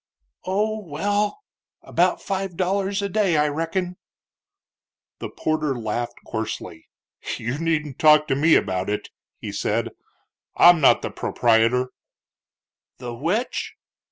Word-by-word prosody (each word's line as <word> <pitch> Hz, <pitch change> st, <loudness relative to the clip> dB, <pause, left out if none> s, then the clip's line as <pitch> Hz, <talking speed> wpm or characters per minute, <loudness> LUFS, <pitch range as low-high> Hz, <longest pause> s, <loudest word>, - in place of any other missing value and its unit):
"Oh, 215 Hz, +3 st, 0 dB
well, 205 Hz, -, -1 dB, 0.4 s
about -, -, +1 dB
five 195 Hz, -3 st, -3 dB
dollars 195 Hz, +2 st, 0 dB
a -, -, 0 dB
day, 200 Hz, -5 st, +1 dB
I 150 Hz, 0 st, +3 dB
reckin." 170 Hz, +4 st, -2 dB, 1.2 s
The -, -, -5 dB
porter 155 Hz, -4 st, -1 dB
laughed 120 Hz, +1 st, -3 dB
coarsely. 105 Hz, -7 st, -5 dB, 0.5 s
"You 120 Hz, +5 st, -4 dB
needn't 155 Hz, -4 st, -1 dB
talk 150 Hz, -1 st, +6 dB
to 135 Hz, -, +2 dB
me 155 Hz, +4 st, +4 dB
about 95 Hz, +1 st, 0 dB
it," 105 Hz, -, -3 dB, 0.3 s
he 105 Hz, -, -6 dB
said; 110 Hz, +3 st, -1 dB, 0.7 s
"I'm 175 Hz, -2 st, +7 dB
not 135 Hz, -, +5 dB
the -, -, -3 dB
proprietor." 120 Hz, +2 st, +2 dB, 1.1 s
"The 125 Hz, -1 st, -6 dB
which?" 175 Hz, -, -2 dB
155 Hz, 120 wpm, -23 LUFS, 120-190 Hz, 1.2 s, I'm